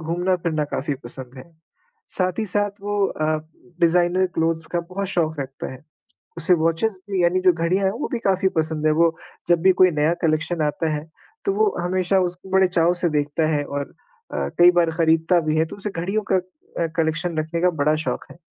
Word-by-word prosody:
घूमना-फिरना 170 Hz, -1 st, -1 dB
काफ़ी 145 Hz, +1 st, -2 dB
पसंद 125 Hz, +1 st, -8 dB
है। 130 Hz, -, -9 dB, 0.7 s
साथ 185 Hz, +1 st, 0 dB
ही 220 Hz, -, -1 dB
साथ 205 Hz, +1 st, +1 dB
वो 205 Hz, 0 st, -2 dB
अ, 155 Hz, -, -3 dB, 0.6 s
डिज़ाइनर 175 Hz, +2 st, +3 dB
क्लोथ्स 165 Hz, 0 st, 0 dB
का 170 Hz, -, +2 dB
बहुत 195 Hz, +1 st, -3 dB
शौक 160 Hz, -5 st, 0 dB
रखता 135 Hz, 0 st, -6 dB
है। 130 Hz, -, -12 dB, 0.5 s
उसे 175 Hz, +2 st, +3 dB
वॉचेज़ 165 Hz, +5 st, 0 dB
भी, 185 Hz, -2 st, +1 dB
यानी 180 Hz, +2 st, +2 dB
जो 185 Hz, -1 st, +5 dB
घड़ियाँ 175 Hz, +4 st, 0 dB
हैं, 190 Hz, -, +3 dB
वो 240 Hz, -, -4 dB
भी 240 Hz, -, 0 dB
काफ़ी 190 Hz, -3 st, +1 dB
पसंद 155 Hz, -1 st, 0 dB
है, 155 Hz, -, +4 dB
वो 165 Hz, +1 st, +2 dB, 0.3 s
जब 170 Hz, -1 st, +4 dB
भी 190 Hz, 0 st, +6 dB
कोई 185 Hz, -, +7 dB
नया 155 Hz, +2 st, +1 dB
कलेक्शन 155 Hz, +1 st, 0 dB
आता 155 Hz, +2 st, -1 dB
है, 150 Hz, +1 st, -4 dB, 0.4 s
तो 395 Hz, -, +1 dB
वो 425 Hz, -1 st, +2 dB
हमेशा 185 Hz, +2 st, +1 dB
उसको 180 Hz, +1 st, -4 dB
बड़े 190 Hz, 0 st, +4 dB
चाव 175 Hz, -1 st, +2 dB
से 175 Hz, -, +3 dB
देखता 145 Hz, +2 st, 0 dB
है 145 Hz, -, 0 dB
और 140 Hz, 0 st, -5 dB, 0.4 s
अ, -, -, -2 dB
कई 175 Hz, 0 st, +8 dB
बार 175 Hz, -2 st, +2 dB
खरीदता 165 Hz, +2 st, +3 dB
भी 155 Hz, 0 st, -1 dB
है, 160 Hz, -, +3 dB
तो -, -, -9 dB
उसे 200 Hz, +1 st, -5 dB
घड़ियों 195 Hz, +5 st, -2 dB
का 190 Hz, -, +5 dB
अ, 185 Hz, -2 st, -4 dB
कलेक्शन 165 Hz, +1 st, 0 dB
रखने 160 Hz, +2 st, -2 dB
का 180 Hz, -, +4 dB
बड़ा 150 Hz, +2 st, +3 dB
शौक -, -, -2 dB
है। 155 Hz, -, -17 dB
170 Hz, 205 wpm, -22 LUFS, 160-185 Hz, 0.7 s, कई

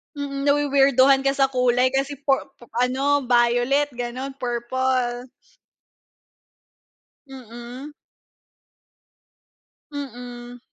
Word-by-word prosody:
Mm, 280 Hz, 0 st, -4 dB
na-wi-weirduhan 275 Hz, -2 st, +4 dB
ka 275 Hz, -, +2 dB
sa 270 Hz, -1 st, +2 dB
kulay 250 Hz, 0 st, +2 dB
kasi 275 Hz, +2 st, -1 dB
pu 275 Hz, 0 st, +1 dB, 0.2 s
pu -, -, -18 dB, 0.2 s
ano 270 Hz, +3 st, +2 dB
violet 245 Hz, +4 st, +2 dB
ganon, 245 Hz, +2 st, -5 dB
purple. 245 Hz, 0 st, -1 dB, 2.0 s
Mm. 250 Hz, +1 st, -10 dB, 2.0 s
Mm. 245 Hz, -3 st, -8 dB
260 Hz, 80 wpm, -23 LUFS, 245-275 Hz, 2.0 s, na-wi-weirduhan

